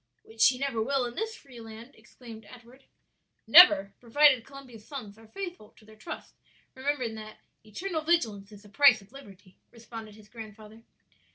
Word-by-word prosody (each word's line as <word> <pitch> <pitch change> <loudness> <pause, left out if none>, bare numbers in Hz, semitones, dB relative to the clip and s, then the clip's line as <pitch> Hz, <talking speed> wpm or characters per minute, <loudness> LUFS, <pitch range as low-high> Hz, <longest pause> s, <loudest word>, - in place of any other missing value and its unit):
"Which 225 0 -10
she 255 - +5
never 270 -4 -2
will 270 +2 0
in 240 - -6
this 445 - -4
free 255 - -14
land," 225 +3 -12
exclaimed 225 -3 -14
Edward. 250 +2 -16 0.6
"Never, 310 - +7
provided 260 +1 +4
Columbia's 270 -5 -13
sons 225 -7 -9
are 225 0 -18
faithful 355 - -9
to 215 - -20
their 215 0 -17
trust; 215 - -9 0.4
remembering 260 -3 -3
that 215 -1 -10 0.3
'eternal 315 - -5
vigilance 225 -12 -1
is 205 0 -14
the 205 - -16
price 250 -2 +5
of 195 - -23
liberty,'" 200 -8 -15
responded 225 -2 -11
his 210 -1 -17
grandfather. 220 -1 -12
230 Hz, 165 wpm, -28 LUFS, 215-275 Hz, 0.6 s, Never